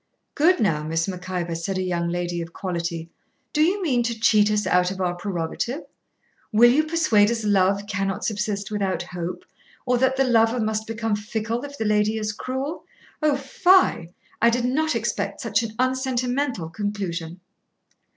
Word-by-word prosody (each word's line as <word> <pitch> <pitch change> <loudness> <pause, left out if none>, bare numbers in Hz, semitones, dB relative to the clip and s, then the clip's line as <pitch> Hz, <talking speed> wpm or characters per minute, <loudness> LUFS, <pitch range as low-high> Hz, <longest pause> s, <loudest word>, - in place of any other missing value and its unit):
'Good 345 +5 +4
now, 160 -8 +1
Miss 165 +3 -1
Mac 185 -1 -6
Ivor,' 175 -2 -2
said 165 +4 -3
a 185 - -1
young 170 -2 -1
lady 175 0 -2
of 165 0 -8
quality, 170 -2 -4 0.4
'do 300 - +2
you 370 +5 +2
mean 255 -8 +2
to 235 -1 -2
cheat 215 -2 +4
us 210 0 +1
out 180 0 +3
of 190 0 -6
our 180 -1 0
prerogative? 185 - -3 0.7
will 240 +2 +6
you 305 +5 +3
persuade 270 -11 +3
us 230 -1 -2
love 200 -1 +2
cannot 195 -1 -2
subsist 210 -1 -2
without 195 -4 -1
hope, 180 0 -6 0.4
or 250 -1 +2
that 260 +1 +2
the 270 - +4
lover 235 -1 +3
must 220 0 -1
become 225 -1 -1
fickle 220 +3 -3
if 285 0 -9
the 220 - -2
lady 210 +1 +2
is 215 -1 -2
cruel? 265 +8 -4 0.4
O 300 -2 +3
fie! 275 - +3 0.3
I 235 - +6
did 240 +1 0
not 305 +3 +1
expect 200 -3 -2
such 215 -2 +1
an 225 -2 -5
unsentimental 255 - -1
conclusion.' 185 -5 -4
210 Hz, 170 wpm, -24 LUFS, 185-245 Hz, 0.7 s, will